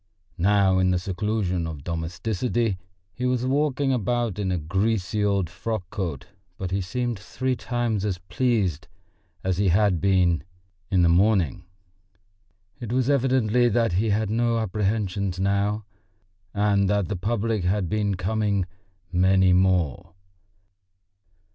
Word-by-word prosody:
Now 95 0 +3
in 95 0 +3
the 90 - +2
seclusion 95 -1 -1
of 75 -4 -7
domesticity 95 - -2 0.3
he 125 0 -2
was 125 -1 0
walking 140 0 +1
about 120 -3 -1
in 95 -2 -1
a 90 - 0
greasy 100 +5 -1
old 100 -3 +1
frock 90 +3 -4
coat, 85 - -4 0.3
but 95 -1 -4
he 95 +1 0
seemed 120 +3 -3
three 130 +5 -2
times 120 -5 -2
as 100 -4 -1
pleased 90 - -1 0.6
as 95 -1 -1
he 100 - +2
had 95 -1 +3
been 90 -4 +2 0.5
in 90 -2 +3
the - - +5
morning. 95 0 +2 1.1
It 120 -3 -6
was 130 +2 +2
evidently 125 -3 +2
that 115 -1 +1
he 105 +5 +1
had 105 0 0
no 115 +1 +1
apprehensions 100 -3 -1
now, 100 +2 0 0.7
and 100 -1 +2
that 100 -3 +1
the 105 - -3
public 110 +1 -1
had 95 +1 0
been 105 0 0
coming 100 +1 0 0.5
"many 95 +1 +4
more." 90 -6 +1
100 Hz, 135 wpm, -25 LUFS, 90-115 Hz, 1.1 s, the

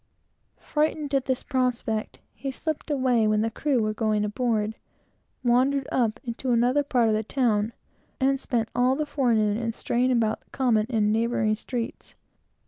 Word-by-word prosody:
Frightened 300 -1 -1
at 270 -1 +2
this 260 -1 -1
prospect, 250 -5 -1
he 275 - -5
slipped 310 +4 -4
away 255 -6 +2
when 215 0 +2
the 225 +1 0
crew 260 -1 0
was 215 0 0
going 215 -1 0
aboard, 215 -1 0 0.7
wandered 260 +3 +2
up 230 -4 +1
into 250 +1 -3
another 245 +4 +3
part 250 -5 +2
of 220 - +2
the 215 - +1
town, 220 -2 0 0.5
and 270 0 +2
spent 235 -4 -1
all 250 +2 +3
the 305 +2 -1
forenoon 230 -8 +1
in 230 -1 -2
straying 250 +3 0
about 225 -3 +1
the - - -35
common, 230 -5 +1
and 220 -4 +1
the 215 +1 +2
neighboring 225 -2 +1
streets. 240 +2 -6
240 Hz, 165 wpm, -26 LUFS, 220-265 Hz, 0.7 s, another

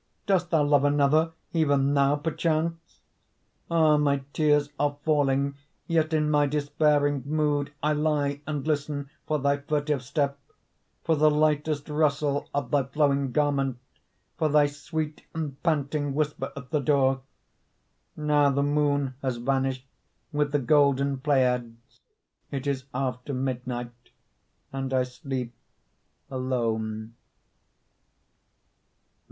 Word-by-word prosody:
Dost 180 -3 +1
thou 160 -4 +3
love 145 -1 +3
another, 145 +3 +3 0.2
Even 145 -4 +2
now, 140 0 +3
perchance? 165 +2 -2 0.7
Ah, 160 -2 +4
my 140 -2 +1
tears 150 -2 +3
are 145 0 0
falling, 140 -2 +2 0.3
Yet 160 -1 +1
in 155 -1 +2
my 145 -1 +3
despairing 145 -1 +1
Mood 145 -1 0
I 150 +1 +2
lie 150 -2 0
and 150 -2 -3
listen 145 -2 -2 0.2
For 155 - +1
thy 140 0 +1
furtive 145 -1 -1
step; 140 +1 -1 0.6
For 165 - +2
the 155 +1 +5
lightest 150 -1 +1
rustle 150 -2 0
Of 145 - -3
thy 140 -3 +2
flowing 140 -1 +1
garment, 140 -2 +1 0.6
For 155 -2 +2
thy 150 0 +5
sweet 150 +2 -4
and 150 -4 -4
panting 145 -3 0
Whisper 150 0 -1
at 125 0 -9
the 150 - +2
door. 135 -1 +2 1.0
Now 150 -1 +3
the 140 +1 +1
moon 145 -2 +1
has 130 -3 -2
vanished 130 +1 -1 0.5
With 145 -1 0
the 145 - +2
golden 140 0 +2
Pleiads; 125 -4 +1 0.7
It 140 -1 -4
is 135 -2 -2
after 130 +1 -3
midnight 125 -2 -3 0.8
And 135 -1 -2
I 130 - +3
sleep 125 -1 -5 0.8
alone. 115 -4 -2
145 Hz, 120 wpm, -26 LUFS, 135-150 Hz, 1.0 s, the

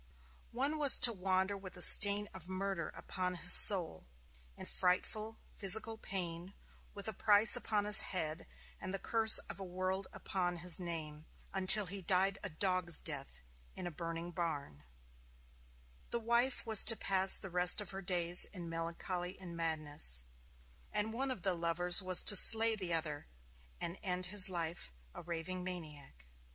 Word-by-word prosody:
One 280 +6 -5
was 285 -3 +5
to 240 -2 +6
wander 190 0 -4
with 190 -2 -13
the 180 - -6
stain 205 0 +6
of 185 -1 -12
murder 190 -2 -7
upon 180 -1 -7
his 180 +1 +5
soul, 170 - +5 0.5
in - - -11
frightful 215 +4 -4 0.2
physical 220 +3 0
pain, 180 0 -8 0.4
with 200 0 -8
a 220 - -5
price 205 +2 +3
upon 210 -2 -4
his 210 -1 +10
head 160 - -7 0.3
and 185 - -8
the - - -6
curse 220 +1 +5
of - - -2
a - - -9
world 185 +1 -7
upon 180 -2 -6
his 180 0 0
name, 160 -3 -10 0.3
until 195 +2 +4
he 195 +2 -9
died 190 +2 -2
a 205 - -8
dog's 185 0 -1
death 135 - -6 0.3
in - - -10
a 175 - -8
burning 165 +1 -9
barn; 145 - -8 1.3
the 235 - -4
wife 235 +3 -3
was 220 -3 +5
to 225 - +4
pass 190 -2 +1
the 190 - -12
rest 180 +3 +2
of 210 - -8
her 195 0 -10
days 175 -1 -1
in 175 -4 -11
melancholy 170 +2 -8
and 175 -3 -12
madness; 150 - +1 0.7
and 215 +1 -5
one 265 +3 -6
of 250 -9 -9
the 190 -2 -3
lovers 175 +2 +2
was 185 -1 +5
to 205 - +2
slay 225 +2 +5
the 185 -4 -7
other, 155 -3 -4 0.5
and 170 +3 -9
end 180 -2 -4
his 190 +1 -1
life 170 - -7 0.2
a - - -12
raving 175 +2 -9
maniac. 150 - -11
185 Hz, 165 wpm, -31 LUFS, 170-200 Hz, 1.3 s, his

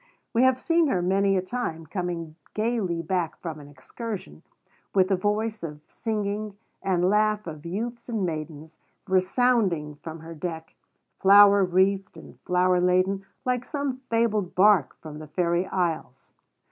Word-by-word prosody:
We 235 - +3
have 260 0 +4
seen 330 +2 +2
her 195 -10 +1
many 195 +1 +2
a 185 - 0
time 185 -6 -4
coming 170 -2 -4 0.2
gayly 215 -7 -1
back 175 -1 -1
from 160 -3 -6
an 145 - -12
excursion, 180 - -8 0.5
with 190 -1 +4
the 195 - +3
voice 210 +3 -1
of 150 -3 -6
singing, 210 -2 -3 0.2
and 180 -2 +1
laugh 210 +1 +2
of 155 -1 -8
youths 235 +7 -5
and 220 -5 -1
maidens, 155 -1 -6 0.3
resounding 190 -4 +2
from 160 +1 -8
her 165 +1 -9
deck, 160 0 -6 0.5
flower 200 0 +7
wreathed 190 +2 +1
and - - -13
flower 180 0 +3
laden 185 +2 +1 0.2
like 250 -1 0
some 280 -2 -3
fabled 220 -5 0
bark 190 -7 +4
from 150 -1 -8
the 155 - -9
fairy 170 +3 0
isles. 160 -8 -3
185 Hz, 145 wpm, -26 LUFS, 165-215 Hz, 0.5 s, flower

